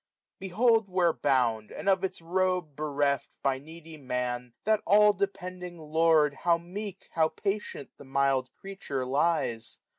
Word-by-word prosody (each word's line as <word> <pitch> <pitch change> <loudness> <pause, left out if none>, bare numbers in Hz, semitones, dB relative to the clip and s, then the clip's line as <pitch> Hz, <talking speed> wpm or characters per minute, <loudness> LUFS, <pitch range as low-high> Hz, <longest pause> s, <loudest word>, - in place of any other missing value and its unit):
Behold 220 +3 +2
where 180 -3 +2
bound, 120 -6 +1
and - - -7
of 190 -1 +3
its 185 -3 -3
robe 180 -3 0
bereft. 145 -1 -1
By 135 -1 +1
needy 160 +2 -12
Man, 125 -3 -3
that 215 0 +2
all 210 +1 +6
depending 185 -3 -4
lord. 155 -1 +3
How 170 +3 +2
meek, 190 +3 -7
how 160 -1 +3
patient, 195 -5 -4
the - - -12
mild 135 -1 +1
creature 190 -9 -5
lies 135 -4 0
165 Hz, 140 wpm, -28 LUFS, 140-190 Hz, -, all